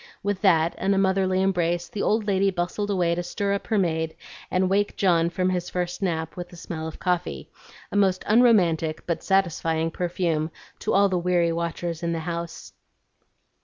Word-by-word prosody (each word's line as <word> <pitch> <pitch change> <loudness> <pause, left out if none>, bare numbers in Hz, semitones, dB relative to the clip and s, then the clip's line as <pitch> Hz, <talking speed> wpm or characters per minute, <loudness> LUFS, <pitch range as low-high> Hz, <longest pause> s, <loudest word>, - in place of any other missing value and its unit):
With 200 -2 -1
that 170 -5 +4
and 195 +1 +2
a - - 0
motherly 190 -1 +2
embrace, 175 -2 0
the 205 - -5
old 215 0 +1
lady 195 -1 +2
bustled 180 +3 -2
away 180 -4 +1
to 175 - -1
stir 200 +3 -2
up 200 - -3
her 220 - +1
maid 160 -4 0 0.3
and 185 +1 +1
wake 200 +2 +1
John 170 -3 +3
from 185 +1 0
his 180 -1 -2
first 180 +1 -3
nap 160 -4 -2
with 175 -1 -6
the 175 - -13
smell 160 -1 -6
of 160 - -8
coffee, 180 -1 -2 0.4
a - - -5
most 190 -2 +2
unromantic 180 -9 +3
but 170 - -2
satisfying 165 -4 +1
perfume 170 -3 -1 0.3
to - - -1
all 200 +1 +5
the 185 -2 0
weary 175 -1 +2
watchers 170 0 -3
in 170 -1 -1
the 165 - -2
house. 170 0 -5
180 Hz, 185 wpm, -25 LUFS, 170-195 Hz, 0.4 s, all